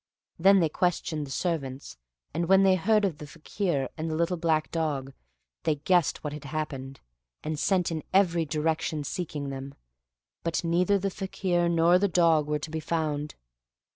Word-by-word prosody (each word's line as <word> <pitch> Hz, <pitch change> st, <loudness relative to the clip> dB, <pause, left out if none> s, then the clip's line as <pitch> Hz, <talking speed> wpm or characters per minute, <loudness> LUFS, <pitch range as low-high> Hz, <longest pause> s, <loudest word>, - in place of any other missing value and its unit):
Then 195 Hz, +2 st, +6 dB
they 165 Hz, -, +3 dB
questioned 155 Hz, -3 st, -1 dB
the -, -, -9 dB
servants, 135 Hz, -, -3 dB, 0.4 s
and 170 Hz, +2 st, -1 dB
when 195 Hz, 0 st, +6 dB
they 190 Hz, -1 st, +5 dB
heard 210 Hz, +3 st, +3 dB
of 165 Hz, -6 st, -2 dB
the 150 Hz, -, -8 dB
Fakir 160 Hz, -2 st, -2 dB
and 160 Hz, 0 st, -3 dB
the 155 Hz, -, -2 dB
little 170 Hz, +2 st, +1 dB
black 160 Hz, -2 st, 0 dB
dog, 145 Hz, -5 st, -2 dB, 0.5 s
they 155 Hz, -, +1 dB
guessed 170 Hz, +3 st, +1 dB
what 150 Hz, -1 st, -4 dB
had 150 Hz, -1 st, -8 dB
happened, 135 Hz, -3 st, -5 dB, 0.4 s
and 155 Hz, -1 st, -3 dB
sent 180 Hz, -1 st, +1 dB
in 160 Hz, -1 st, -2 dB
every 175 Hz, -3 st, +3 dB
direction 155 Hz, 0 st, -1 dB
seeking 150 Hz, -2 st, -4 dB
them, 135 Hz, 0 st, -7 dB, 0.7 s
but 165 Hz, +2 st, -1 dB
neither 180 Hz, +4 st, +2 dB
the 195 Hz, 0 st, -2 dB
Fakir 180 Hz, -3 st, -1 dB
nor 170 Hz, +1 st, +4 dB
the 200 Hz, -, +2 dB
dog 165 Hz, -4 st, +3 dB
were 150 Hz, 0 st, 0 dB
to 150 Hz, +1 st, -7 dB
be 160 Hz, -, -2 dB
found. 155 Hz, -2 st, -2 dB
160 Hz, 170 wpm, -27 LUFS, 150-180 Hz, 0.7 s, Then